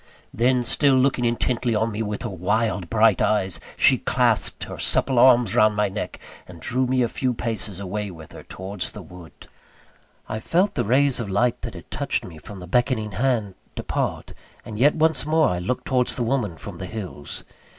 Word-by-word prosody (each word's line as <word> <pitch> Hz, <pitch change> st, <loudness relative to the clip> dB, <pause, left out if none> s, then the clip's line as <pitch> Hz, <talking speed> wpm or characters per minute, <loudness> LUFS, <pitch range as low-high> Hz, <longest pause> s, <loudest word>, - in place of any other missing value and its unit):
Then, 125 Hz, +2 st, +2 dB
still 140 Hz, +2 st, +3 dB
looking 130 Hz, -1 st, +2 dB
intently 120 Hz, 0 st, 0 dB
on 110 Hz, +2 st, 0 dB
me 105 Hz, +1 st, -4 dB
with 105 Hz, 0 st, -3 dB
her 115 Hz, -, -3 dB
wild 100 Hz, 0 st, -1 dB
bright 110 Hz, -2 st, +4 dB
eyes, 95 Hz, -4 st, +1 dB, 0.2 s
she -, -, +4 dB
clasped -, -, +1 dB
her -, -, -8 dB
supple 130 Hz, -3 st, +2 dB
arms 125 Hz, -2 st, +5 dB
round 110 Hz, -1 st, +4 dB
my 105 Hz, -1 st, +1 dB
neck, 95 Hz, -, -5 dB, 0.3 s
and 85 Hz, -2 st, -12 dB
drew 130 Hz, +6 st, -1 dB
me 130 Hz, 0 st, +2 dB
a -, -, +2 dB
few 125 Hz, +1 st, -2 dB
paces 110 Hz, -5 st, -4 dB
away 100 Hz, +2 st, -4 dB
with 80 Hz, -4 st, -11 dB
her -, -, -10 dB
towards 95 Hz, 0 st, -6 dB
the -, -, -8 dB
wood. 90 Hz, -2 st, -14 dB, 0.8 s
I 110 Hz, -, -4 dB
felt 180 Hz, -, +1 dB
the -, -, -1 dB
rays 135 Hz, +4 st, +3 dB
of 115 Hz, -4 st, -4 dB
light 115 Hz, +5 st, +1 dB
that -, -, -6 dB
had -, -, -12 dB
touched -, -, -1 dB
me 80 Hz, -3 st, -11 dB
from 100 Hz, +5 st, -10 dB
the 90 Hz, -, -8 dB
beckoning 115 Hz, 0 st, 0 dB
hand, 110 Hz, -2 st, 0 dB, 0.2 s
depart; -, -, -3 dB, 0.3 s
and 105 Hz, -1 st, -7 dB
yet 145 Hz, +4 st, +4 dB
once 160 Hz, -1 st, +3 dB
more 155 Hz, 0 st, +3 dB
I 90 Hz, -, -1 dB
looked 110 Hz, +8 st, -3 dB
towards 125 Hz, -1 st, +2 dB
the 125 Hz, -, 0 dB
woman 115 Hz, -8 st, -1 dB
from 95 Hz, -1 st, -9 dB
the 95 Hz, -, -5 dB
hills. 90 Hz, -8 st, -7 dB
110 Hz, 195 wpm, -23 LUFS, 100-125 Hz, 0.8 s, arms